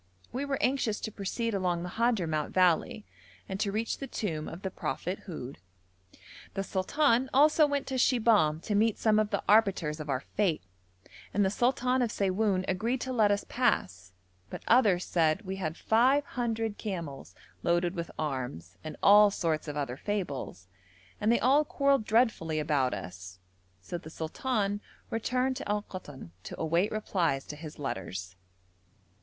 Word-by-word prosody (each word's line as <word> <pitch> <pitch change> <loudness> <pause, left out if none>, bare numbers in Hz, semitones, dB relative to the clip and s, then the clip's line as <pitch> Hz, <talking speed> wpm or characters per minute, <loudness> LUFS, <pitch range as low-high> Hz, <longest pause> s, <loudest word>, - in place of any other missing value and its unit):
We 265 +3 -3
were 280 -1 -1
anxious 250 -5 +1
to 220 - -4
proceed 225 +4 -3
along 180 -3 0
the 180 - -4
Hadhramout 180 -9 0
valley 185 +5 +2 0.4
and 190 -1 -4
to 205 -2 0
reach 220 +3 -2
the 275 - -5
tomb 160 -12 -3
of 170 +4 -8
the 190 - -3
prophet 180 +2 -3
Houd. 140 - -7 1.0
The 195 - -1
sultan 245 +7 +1
also 305 +2 +6
went 285 -1 -1
to 265 -1 -2
Shibahm 215 - +3
to 210 - -3
meet 215 +1 +3
some 215 -1 +3
of 215 -1 +1
the 200 - -1
arbiters 195 -8 +3
of 155 -1 -6
our 135 -1 0
fate, 185 0 -1 0.7
and 205 0 +3
the 190 - +1
sultan 250 +2 +1
of 240 - +1
Siwoun 195 -1 +1
agreed 230 +7 0
to 260 - -3
let 220 -4 +4
us 205 0 0
pass: 95 - 0 0.4
but - - -7
others 210 -7 +4
said 160 +3 +1
we 190 0 -5
had 160 -4 -3
five 260 +6 +3
hundred 225 -4 -2
camels 165 - -6 0.3
loaded 175 - +1
with 170 -3 -4
arms, 125 - -4
and 155 -1 -7
all 205 +1 +8
sorts 165 -5 -1
of 150 0 -4
other 135 -3 -3
fables, 145 - -4 0.5
and 215 - +3
they 235 - +3
all 275 +4 +4
quarrelled 275 -5 +1
dreadfully 215 -9 +2
about 145 -6 +1
us, 90 -1 -8 0.4
so 175 - -6
the 160 - -11
sultan 205 +5 -2 0.3
returned 250 +3 0
to - - -6
Al 210 0 0
Koton 145 - -9
to - - -8
await 170 +5 +1
replies 175 -10 0
to 150 - -7
his 155 0 -9
letters. 95 -8 -5
195 Hz, 165 wpm, -29 LUFS, 155-230 Hz, 1.0 s, all